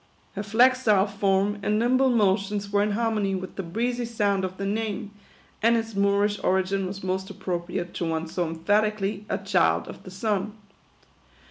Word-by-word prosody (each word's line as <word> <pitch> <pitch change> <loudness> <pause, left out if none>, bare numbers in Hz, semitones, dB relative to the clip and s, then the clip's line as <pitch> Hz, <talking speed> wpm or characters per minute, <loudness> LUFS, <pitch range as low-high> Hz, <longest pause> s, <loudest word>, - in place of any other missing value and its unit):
Her 200 - -4
flexile 225 -1 +4
form 200 0 +1
and 210 +1 +1
nimble 255 +4 +3
motions 200 -2 +1
were 205 0 +3
in 210 0 +1
harmony 215 -3 0
with 185 0 -6
the - - -3
breezy 235 +7 -2
sound 205 -4 0
of 185 0 -4
the 195 - -3
name; 210 0 -2 0.5
and 230 +2 +4
its 225 0 -3
Moorish 200 +1 +1
origin 190 +1 +1
was 195 +1 -7
most 190 +1 -2
appropriate 175 -1 -4
to 175 - -3
one 160 0 -1
so 170 +1 -2
emphatically 205 +4 0
" - - -25
a - - 0
child - - +1
of - - -9
the - - -11
sun." 205 +2 -2
200 Hz, 170 wpm, -25 LUFS, 190-215 Hz, 0.5 s, flexile